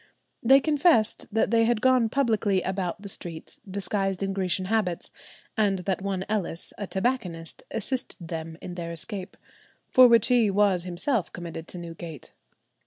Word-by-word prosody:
They 265 +3 +7
confessed 290 -7 +2
that 225 +1 +1
they 230 -1 +4
had 235 -1 +2
gone 255 -2 +3
publicly 220 -7 +1
about 190 0 -3
the - - -6
streets 170 -4 -8
disguised 195 0 -1
in 195 0 -1
Grecian 185 -1 0
habits, 190 -4 -1 0.4
and 205 -3 +2
that 190 -1 -1
one 190 -1 -2
Ellis, 195 -5 -3
a 205 - -3
tobacconist, 190 -7 -2
assisted 250 +4 -3
them 160 -1 -5
in 180 - -6
their 170 -1 -5
escape, 185 +3 -4 0.5
for 255 -1 +8
which 235 -1 +5
he 240 -4 +4
was 195 -3 +3
himself 185 +5 0
committed 170 -2 -7
to - - -7
Newgate. 165 -3 -8
195 Hz, 155 wpm, -26 LUFS, 175-225 Hz, 0.5 s, for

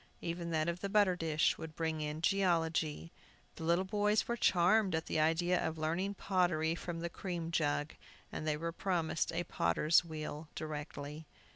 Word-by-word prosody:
Even 170 0 -3
that 155 -1 0
of 170 +1 -1
the 200 - -2
butter 200 -3 +4
dish 160 -3 +1
would 160 -1 -7
bring 160 -1 -1
in 150 +1 -3
geology. 165 -4 +1 0.5
The - - -6
little 170 +3 +3
boys 210 +2 +1
were 235 - 0
charmed 190 -1 +3
at 160 - -2
the - - -1
idea 170 +3 +2
of 160 - -2
learning 170 +6 -1
pottery 175 -5 +1
from 170 -1 -5
the 170 - -1
cream 170 -3 -4
jug, 150 -2 0 0.4
and 155 - -4
they 150 -1 +1
were 165 +2 -3
promised 170 -2 -1
a 170 +1 -1
potter's 150 - +3
wheel 155 -1 -6
directly. 150 0 -6
165 Hz, 170 wpm, -34 LUFS, 155-180 Hz, 0.5 s, butter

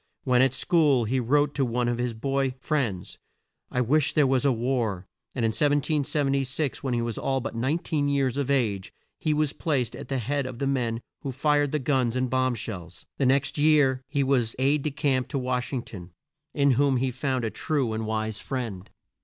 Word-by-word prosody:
When 125 -2 +3
at 135 0 +3
school 145 -6 +3
he 130 +4 0
wrote 145 +4 +2
to 140 - 0
one 120 0 0
of 120 0 -1
his 120 -2 -1
boy 135 +2 -1
friends, 125 -11 -2 0.5
"I 125 - 0
wish 145 +4 +2
there 150 - +4
was 135 0 +2
a 140 - +5
war;" 115 -6 -1 0.3
and 120 -4 0
in - - +3
1776 145 0 0
when 130 -3 -1
he 120 - 0
was 115 -2 -3
but 135 -4 -1
19 145 +4 -1
years 140 -3 +1
of 140 -1 -2
age, 110 -9 0 0.3
he 155 - 0
was 150 -1 +1
placed 125 -7 -1
at 140 - -8
the 135 - -1
head 135 +3 -1
of 130 -2 -7
the 140 - -2
men 120 -4 -1 0.2
who 140 - -4
fired 145 +2 +1
the 155 - +1
guns 130 -4 0
and 130 -1 -1
bomb 130 -1 +1
shells. 95 -6 -7
The 135 - +3
next 140 +2 +1
year 145 -4 +4
he 140 0 0
was 125 -4 +1
aide 140 +3 +2
de 150 - -1
camp 135 -2 0
to 145 - -3
Wash 125 -1 -2
ing 130 -4 -2
ton, 90 -4 -10 0.4
in 140 -2 +4
whom 135 +1 +3
he 130 +1 0
found 130 -1 -1
a 110 - -2
true 140 -8 -1
and 110 0 -3
wise 110 0 -2
friend. 115 -8 -5
130 Hz, 205 wpm, -26 LUFS, 120-140 Hz, 0.5 s, a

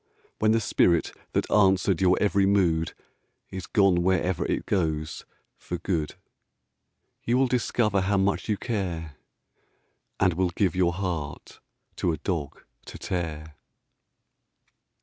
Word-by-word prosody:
When 110 - +3
the 115 - +3
spirit 85 -5 +2 0.2
that - - -1
answered 95 -3 +3
your 90 -1 +4
every 100 -1 +2
mood 85 -5 +1 0.6
Is 95 -1 -6
gone 100 -6 +3
wherever 90 -1 +1
it - - -2
goes 80 -5 -2 0.3
for 90 - -5
good, 80 -4 -2 1.1
You 120 +2 +1
will 135 - +4
discover 115 -5 +1
how 100 +2 +1
much 95 +1 0
you 105 - +1
care, 85 - -4 1.0
And 95 -2 +3
will 90 +2 +1
give 90 0 0
your 90 -1 +2
heart 85 -6 -5 0.4
to 90 - +1
a 80 - -3
dog 75 -3 -4 0.2
to - - -9
tear! 80 -4 -4
95 Hz, 130 wpm, -26 LUFS, 85-100 Hz, 1.1 s, your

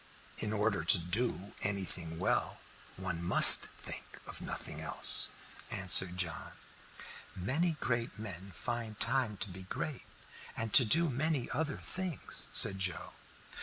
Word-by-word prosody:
"In 105 - -4
order 105 -4 -3
to 85 - +3
do 95 +3 -4
anything 90 -5 -4
well, 90 - -4 0.4
one 85 - -6
must 85 - +10
think - - -9
of - - -11
nothing - - -8
else," - - +4 0.4
answered 95 -1 +2
John. 85 -4 -6 0.8
"Many 150 - -4
great 120 -1 -5
men 100 -3 -11
find 115 +2 -8
time 125 -6 -3
to 105 - -6
be 95 +1 -13
great 120 +9 -9 0.5
and 110 -2 -7
to 125 - +5
do 165 +9 0
many 145 -1 -5
other 150 +1 -5
things," 185 -5 -8
said 95 - +4
Joe. 95 -3 -6
105 Hz, 130 wpm, -29 LUFS, 90-125 Hz, 0.8 s, must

